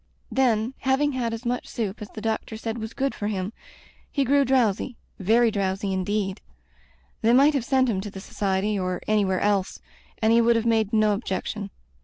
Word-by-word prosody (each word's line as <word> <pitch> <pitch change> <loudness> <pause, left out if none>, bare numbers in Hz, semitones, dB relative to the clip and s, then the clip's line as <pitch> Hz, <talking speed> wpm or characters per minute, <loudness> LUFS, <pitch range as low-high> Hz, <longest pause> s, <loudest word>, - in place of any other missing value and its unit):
Then, 240 -2 +2
having 270 +2 +2
had 245 -3 -1
as 230 +2 -6
much 245 +1 -2
soup 215 -2 -4
as 210 - -7
the 215 - -9
doctor 220 0 -2
said 225 +1 -4
was 220 +1 -6
good 270 0 0
for 205 - -4
him, 195 0 -3 0.6
he 280 - +1
grew 280 +2 +4
drowsy 250 -2 +1
— - - -14
^very 225 +3 +4
drowsy, 195 0 -1
indeed. 195 +1 -1 0.8
They 230 +2 +4
might 280 +4 +6
have 275 -4 0
sent 260 +1 +2
him 200 -5 0
to 205 - -6
the 195 - -9
Society, 195 +1 -1
or 185 -1 -2
anywhere 200 -4 +2
else, 200 -2 0 0.4
and 220 +1 +3
he 235 - +6
would 235 0 +4
have 230 0 0
made 220 -3 +2
no 215 -1 +3
objection. 200 0 -3
220 Hz, 195 wpm, -25 LUFS, 200-240 Hz, 0.8 s, might